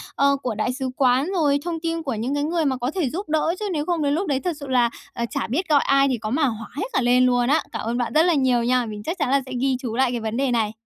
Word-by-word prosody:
ờ, 280 0 +3
của 245 -4 -2
đại 215 +4 -1
sứ 260 0 -3
quán, 260 +2 +3
rồi 290 -5 +3
thông 335 -2 -3
tin 330 0 -3
của 270 -5 -2
những 230 +5 -2
cái 290 - 0
người 325 +1 0
mà 265 -2 0
có 250 +2 -2
thể 335 -9 0
giúp 365 +6 -5
đỡ, 315 +2 +1
chứ 425 - -3
nếu 300 -2 -1
không 345 -2 -1
đến 285 0 +1
lúc 360 +6 -1
đấy 275 -3 +1
thật 355 +4 -2
sự 280 - -7
là, 250 -2 +3 0.2
à, 235 - -2
chả - - -3
biết 325 +10 -2
gọi 290 -2 +5
ai 275 0 +4
thì 260 -3 0
có 215 -1 -5
mà 285 +6 +2
hỏa 225 -3 -3
hết 325 - -2
cả 265 - +2
lên 250 +1 +4
luôn 245 -1 +2
á. 300 - +3
Cảm - - -4
ơn 235 +2 -1
bạn 245 -2 -2
rất 310 +1 +5
là 355 - +3
nhiều 260 -5 +2
nha. 250 0 +2
Mình 210 -2 -7
chắc 335 - -3
chắn 295 -4 0
là 275 +1 +3
sẽ 260 - -10
ghi 265 -1 +2
chú 240 -3 -4
lại 260 0 +2
cái 240 - -2
vấn 220 +1 -3
đề 270 -1 +1
này. 225 -3 +1
265 Hz, 325 wpm, -23 LUFS, 245-305 Hz, 0.2 s, gọi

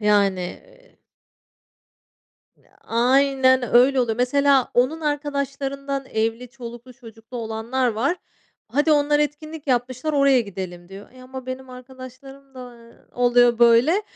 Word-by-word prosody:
yani 200 -3 +2
eee - - -11 1.6
Iıı, - - -31 0.2
aynen 260 +2 +3
öyle 260 +2 +5
oluyor. 225 -3 -1
Mesela 270 +1 +2
onun 260 +7 +1
arkadaşlarından 275 -2 -3
evli, 225 +2 -2
çoluklu 240 0 -11
çocuklu 225 +1 -12
olanlar 230 +3 -2
var. 240 +10 -1 0.5
Hadi 290 +7 +2
onlar 295 0 +2
etkinlik 300 +1 -4
yapmışlar 255 +3 -1
oraya 275 -3 +4
gidelim 180 -4 -7
diyor. 195 +2 -12
Ya 255 0 -15
ama 260 0 -9
benim 255 0 -7
arkadaşlarım 260 +2 -13
da 250 -1 -10 0.4
oluyor 245 -1 +3
böyle. 240 - +4
255 Hz, 120 wpm, -22 LUFS, 235-275 Hz, 1.6 s, öyle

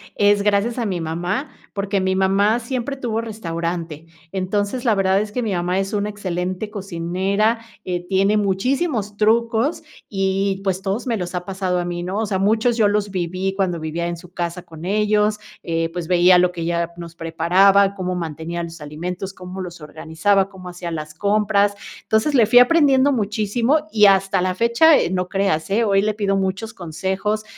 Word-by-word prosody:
es 205 0 +3
gracias 210 +3 +1
a 240 - -1
mi 185 -4 -2
mamá, 175 - -3 0.2
porque, 200 -1 -1
mi 190 0 0
mamá 195 +4 +2
siempre 255 +3 -4
tuvo 230 -4 -2
restaurante. 170 -7 -4 0.3
Entonces, 205 +5 -1
la 230 - +4
verdad 195 0 +2
es 210 0 -5
que 250 - -2
mi 220 -4 -1
mamá 180 +1 0
es 195 +1 -3
una 205 0 0
excelente 185 0 -3
cocinera, 195 +3 -1 0.3
eh, 180 -1 -3
tiene 195 +2 +2
muchísimos 210 - 0
trucos 230 +5 +1 0.3
y 195 0 0
pues, 190 -1 0
todos 200 +6 -3
me 235 - +1
los 180 -2 -5
ha 180 -1 -3
pasado 185 -1 -1
a 175 - -2
mí, 175 0 -4
¿no? 185 +4 -3
O 220 - 0
sea, 200 -2 -1
muchos 220 +5 +2
yo 215 -3 +4
los 205 0 0
viví, 185 +1 -2
cuando 185 -3 -1
vivía 160 +2 -3
en 175 0 -4
su 175 +1 -15
casa 175 0 -4
con 160 -1 -12
ellos, 210 +1 +1 0.2
eh, 165 0 -1
pues, 175 -2 -4
veía 180 0 +6
lo 180 0 +3
que 175 - -7
ella 170 0 -1
nos 170 -1 -9
preparaba, 190 +5 +3
cómo 185 -1 -3
mantenía 165 0 -4
los 165 -1 -8
alimentos, 180 +6 -5
cómo 185 0 -8
los 175 -2 -7
organizaba, 160 +6 0
cómo 190 -2 -11
hacía 175 -1 -6
las 155 -1 -5
compras, 205 +2 +2 0.3
entonces, 220 +7 +1
le 235 -4 +6
fui 245 +3 +6
aprendiendo 280 0 +5
muchísimo 230 +6 0
y 210 -1 +5
hasta 195 -1 +3
la 185 0 0
fecha, 235 +4 0 0.2
eh, - - +1
no 180 -1 -1
creas, 195 -4 0
eh, 225 +4 +3
hoy 195 -3 +3
le 215 0 +1
pido 200 -2 0
muchos 190 +3 -2
consejos, 190 +5 -3
195 Hz, 185 wpm, -21 LUFS, 175-210 Hz, 0.3 s, veía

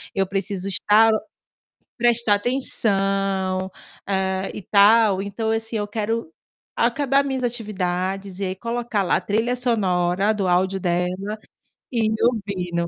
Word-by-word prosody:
eu 195 - +2
preciso 195 0 -3
estar 210 +3 +4 0.9
prestar 235 -3 +3
atenção, 205 -4 0 0.9
eh, 190 -1 -1
e 210 - -7
tal, 205 0 +5
então 205 +3 -3
assim, 225 0 -2
eu 205 - -1
quero 220 -3 -2 0.5
acabar 275 +3 +2
minhas 265 -2 -2
atividades 195 -4 -3
e - - -1
aí 185 0 -2
colocar 235 -1 -2
lá 180 - +1
trilha 225 +4 0
sonora 195 -4 +1
do 195 -3 -1
áudio 185 +2 +1
dela, 180 -1 0 0.8
e 225 -3 +1
ouvindo. 185 -7 -1
205 Hz, 120 wpm, -22 LUFS, 190-230 Hz, 0.9 s, tal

